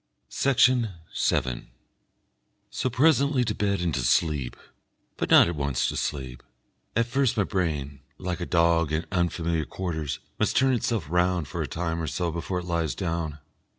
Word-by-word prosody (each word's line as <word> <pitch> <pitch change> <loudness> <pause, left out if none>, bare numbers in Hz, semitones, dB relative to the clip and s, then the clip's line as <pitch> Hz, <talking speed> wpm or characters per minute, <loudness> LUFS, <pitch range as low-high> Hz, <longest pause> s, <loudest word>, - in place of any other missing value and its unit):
Section 125 -5 +3 0.2
7 65 -2 0 1.0
So 130 +2 -1
presently 140 0 +3
to 110 - -1
bed 100 -3 0
and 85 -3 0
to 70 - 0
sleep, 70 0 +1 0.6
but - - -3
not - - +8
at 85 - -2
once 70 -3 0
to - - -4
sleep. 65 -4 -3 0.5
At 115 +1 +3
first 130 0 +1
my 100 - +3
brain, 75 -8 -2 0.2
like 90 -1 -4
a 85 - -3
dog 85 -2 +3
in 80 +2 -1
unfamiliar 85 -3 0
quarters, 80 -6 -3 0.2
must - - +1
turn 135 0 +4
itself 115 -5 -1
round 90 -1 +1
for - - -4
a - - -2
time 85 0 -3
or 80 - -3
so 85 +3 -1
before 85 +3 -3
it 90 - -4
lies 85 -6 -1
down. 80 -4 -3
85 Hz, 165 wpm, -26 LUFS, 80-105 Hz, 1.0 s, not